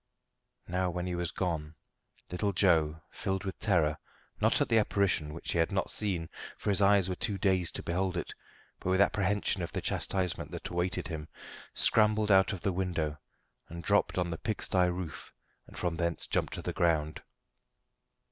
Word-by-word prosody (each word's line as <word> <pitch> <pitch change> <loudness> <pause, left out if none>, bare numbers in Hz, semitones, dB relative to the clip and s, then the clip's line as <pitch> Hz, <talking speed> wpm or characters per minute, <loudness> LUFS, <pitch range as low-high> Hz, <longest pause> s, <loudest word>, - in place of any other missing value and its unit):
Now 90 +1 0
when 90 0 -3
he 90 - -2
was 85 -1 -1
gone, 80 -4 -3 0.6
little 100 +3 0
Joe, 80 -5 +3
filled 95 0 -2
with 95 -2 -5
terror 85 -8 +2 0.4
not - - +3
at - - +2
the 115 - +4
apparition, 100 -7 +1
which 80 - -5
he 85 - 0
had 80 +4 +2
not 95 -1 0
seen, 90 -6 0 0.3
for 105 - -1
his 100 - +2
eyes 100 -2 +5
were 95 - -1
too 100 +2 0
dazed 95 -2 +1
to - - -4
behold 90 +1 -1
it, - - -4 0.5
but - - -3
with 95 +1 +3
apprehension 100 0 +2
of - - -4
the - - -1
chastisement 95 -2 -1
that - - -5
awaited 90 0 -2
him, 80 -2 -5 0.5
scrambled 105 -1 +4
out 95 +1 +5
of 95 -4 -5
the 100 -3 0
window 85 -5 -2 0.5
and 85 +1 -7
dropped 100 +2 +2
on 90 -1 0
the 80 - -4
pigsty 95 -4 +1
roof, 90 -2 -5 0.4
and - - -13
from 85 -2 -1
thence 85 -1 -1
jumped - - -1
to - - -5
the - - -3
ground. 80 -3 +1
90 Hz, 180 wpm, -31 LUFS, 85-95 Hz, 0.6 s, eyes